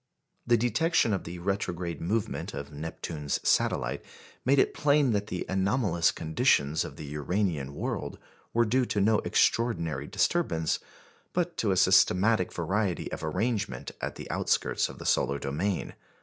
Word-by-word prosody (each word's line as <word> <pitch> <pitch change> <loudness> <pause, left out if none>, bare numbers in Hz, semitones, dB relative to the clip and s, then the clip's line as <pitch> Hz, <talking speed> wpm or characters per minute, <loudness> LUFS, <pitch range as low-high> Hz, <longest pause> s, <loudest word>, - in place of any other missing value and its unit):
The 120 -1 +5
detection 120 +2 +2
of 95 - -2
the 85 +2 -6
retrograde 90 -2 -3
movement 105 +5 -2
of 70 0 -6
Neptune's 75 -1 -4
satellite - - +1 0.4
made 135 +3 +3
it - - +3
plain 145 -3 +3
that 105 -1 0
the 90 - -4
anomalous 95 -3 +1
conditions 80 - +1
of - - -8
the 75 - -8
Uranian 75 -1 -2
world - - -3 0.3
were 120 0 +3
due 125 +4 +2
to 105 - -1
no 105 +2 +4
extraordinary 85 - +1
disturbance, 95 - 0 0.5
but 175 -1 -1
to 110 - 0
a 95 - +2
systematic 95 +2 +4
variety 95 +2 -1
of - - -5
arrangement 90 - -2
at - - -3
the - - -8
outskirts - - +1
of - - -10
the - - -9
solar 70 - +2
domain. 85 +8 -2
95 Hz, 150 wpm, -28 LUFS, 80-115 Hz, 0.5 s, The